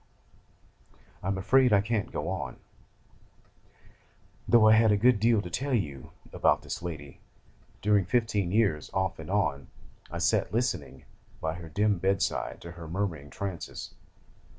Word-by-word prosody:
'I - - -5
am 95 0 0
afraid 125 +6 +4
I 100 - +6
can't 115 +3 -2
go 75 - -3
on: 95 +1 -4 1.9
though 115 -2 +6
I 110 - +8
had 110 0 +5
a 105 - +4
good 120 +1 +4
deal 115 -1 +3
to 90 - -6
tell 135 0 -1
you 70 - -3 0.2
about - - +2
this - - -5
lady. 75 -5 -7 0.6
During 105 -2 +3
fifteen 105 -4 0
years, 100 -8 +1
off 95 -1 -1
and 80 - -8
on, 80 -9 0 0.4
I - - -6
sat - - +1
listening 105 - -2 0.3
by 80 0 -2
her 85 -1 -9
dim 100 +3 +1
bed 95 +1 +1
side - - -3
to 85 - -8
her 85 -2 -9
murmuring 80 -5 -3
trances! 95 -1 -6
100 Hz, 150 wpm, -28 LUFS, 85-110 Hz, 1.9 s, I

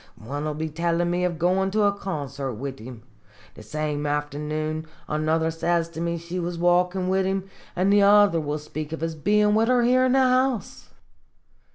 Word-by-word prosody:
One 145 +7 -5
will 150 -1 -2
be 160 +1 -3
tellin' 170 +2 0
me 175 +1 0
of 175 -2 -2
goin' 185 +3 +1
to 210 +2 +1
a 205 - +4
concert 140 - -5
wid 135 +3 -6
him. 115 0 -10 0.5
The - - -13
same 150 +6 -3
afternoon 150 +2 -3 0.2
another 160 +1 0
says 170 +1 0
to 165 -1 -7
me 170 0 -1
she 170 +2 -5
was 175 0 -3
walkin' 180 +2 +2
wid 190 0 +1
him, 195 0 -2 0.3
an' 190 +2 +2
the 205 0 +5
other 200 -4 +5
will 150 0 -2
speak 155 +1 -6
of 160 - -5
his 165 0 -2
bein' 210 +7 +2
wid 220 +1 +3
her 250 -1 +3
here 255 +2 +4
in 255 - +2
the 270 - +4
house 255 -2 0
170 Hz, 195 wpm, -24 LUFS, 150-195 Hz, 0.5 s, the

